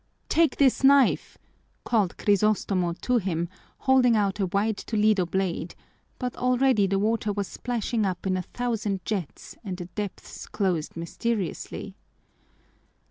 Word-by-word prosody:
"Take 325 -5 +3
this 275 -1 +3
knife!" 275 -1 +4 0.5
called 210 -7 +1
Crisostomo 200 -3 +1
to 250 -1 +2
him, 170 -4 -2 0.3
holding 260 -3 +4
out 205 -1 +1
a 195 - +1
wide 200 +3 0
Toledo 210 -4 +1
blade, 180 -2 -2 0.4
but 250 -2 -3
already 250 -4 +3
the 195 +1 +1
water 215 +1 0
was 200 -1 -2
splashing 235 -2 -2
up 185 -2 -2
in 185 -1 +1
a 185 - -1
thousand 210 -3 -3
jets 190 -8 -4
and 190 -4 -5
the 180 - -6
depths 200 +2 -7
closed 175 -6 -1
mysteriously. 195 +3 -3
205 Hz, 135 wpm, -26 LUFS, 185-235 Hz, 0.5 s, knife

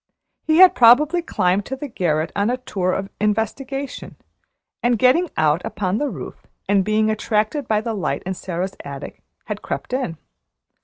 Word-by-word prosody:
He 315 0 +1
had 370 0 +8
probably 290 +9 +5
climbed 190 - 0
to 265 - -3
the 290 +2 -6
garret 165 - -1
on 205 +2 +1
a 250 - 0
tour 190 -7 -2
of 195 +1 -3
investigation, 255 +6 -2 0.7
and 240 0 +2
getting 265 - +3
out 155 +2 +2
upon 195 0 -2
the 290 - 0
roof, - - -9 0.2
and 200 -1 +3
being 215 +2 +2
attracted 220 +5 -1
by 215 -1 +1
the 230 0 -3
light 200 - -2
in 190 - -2
Sara's 185 +1 -4
attic, 140 0 -8 0.2
had - - -5
crept - - -5
in. 255 - -2
215 Hz, 165 wpm, -21 LUFS, 190-260 Hz, 0.7 s, had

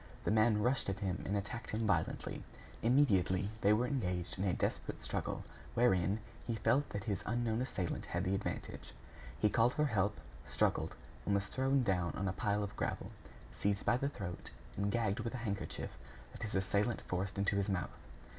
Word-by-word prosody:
The - - +1
man 110 -1 +4
rushed 125 -3 +2
at 95 - -2
him 95 -2 -1
and 100 - +1
attacked 115 +4 -4
him 110 +1 0
violently. 90 -6 0 0.4
Immediately, 100 -6 +3
they 100 - +5
were 110 +4 +4
engaged 90 -9 -1
in 95 - +1
a 95 - +3
desperate - - -2
struggle, - - -2 0.3
wherein 100 -4 +4 0.3
he 115 - 0
felt 120 +6 +2
that 100 -1 -4
his 100 -3 -1
unknown 120 0 +1
assailant 100 -9 -2
had - - -1
the 95 - +1
advantage. 100 - -4 0.5
He - - +5
called 115 +4 +3
for 150 - +3
help, 105 -5 +1 0.2
struggled, - - +1 0.3
and 100 - +2
was 100 0 +1
thrown 135 +3 +2
down 90 -6 +1
on 100 - -1
a 95 - 0
pile 105 +2 +1
of 100 - -5
gravel, - - -2 0.4
seized 100 +6 0
by 120 - +4
the 140 +2 0
throat, 95 -10 -5 0.3
and 100 0 0
gagged 110 -3 +1
with 115 +2 -2
a 120 -1 -4
handkerchief 100 -2 -3 0.4
that - - -11
his 105 - -3
assailant 100 +4 +1
forced 95 +2 -2
into 100 +1 +2
his 100 +1 +1
mouth. 90 -3 -1
100 Hz, 185 wpm, -36 LUFS, 95-120 Hz, 0.5 s, they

